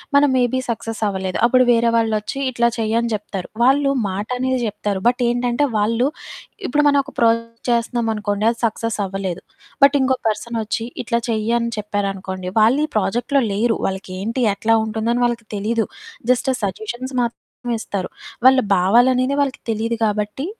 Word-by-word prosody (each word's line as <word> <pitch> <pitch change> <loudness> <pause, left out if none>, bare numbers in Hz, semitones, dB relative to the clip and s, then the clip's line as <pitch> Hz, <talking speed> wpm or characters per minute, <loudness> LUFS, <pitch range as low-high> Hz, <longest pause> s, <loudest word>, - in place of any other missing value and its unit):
మనం 285 0 +5
మేబీ 250 +1 +2
సక్సస్సవ్వలేదు. 215 -5 -2
అప్పుడు 255 +1 +5
వేరే 235 0 +3
వాళ్ళొచ్చీ 225 +3 0
ఇట్లా 235 0 +2
చెయ్యని 230 +1 0
జెప్తారు. 200 -3 -5
వాళ్ళు 275 +2 +4 0.2
మాటనేది 250 +6 -2
జెప్తారు, 205 -2 -3
బట్ 250 +1 +2
ఏంటంటే, 245 +3 +1
వాళ్ళు 230 +5 +2 0.6
ఇప్పుడు 295 +4 +2
మనవొక 285 0 +2
ప్రాజెక్ట్ 230 0 +1
చేస్తన్నామనుకోండి, 225 -3 0
అది 235 - -9
సక్సస్సవ్వలేదు, 195 -5 -3 0.4
బట్ 280 +1 +7
ఇంకో 260 0 +2
పర్సనొచ్చి 225 +1 -3 0.2
ఇట్లా 235 0 0
చెయ్యని 230 +1 0
చెప్పారనుకోండి, 195 -3 -3
వాళ్ళీ 260 +8 +4
ప్రాజెక్ట్‌లో 240 +7 +1
లేరు, 225 +3 +1
వాళ్ళకేంటి, 195 +5 -4
ఎట్లా 225 +2 +2
ఉంటుందని 225 +3 -1
వాళ్ళకి 235 -2 -2
తెలీదు. 225 +2 0 0.5
జస్ట్ 255 +1 +1
ఆ - - -2
సజెషన్స్ 225 +7 -4
మాత్రమే 235 0 -2 0.4
ఇస్తారు. 195 -3 -4 0.4
వాళ్ళ 260 0 +7 0.2
భావాలనేది 250 +8 +3
వాళ్ళకి 280 -1 -2
తెలీదు 225 +2 -1
కాబట్టి, 210 +6 -2
230 Hz, 130 wpm, -20 LUFS, 210-245 Hz, 0.6 s, బట్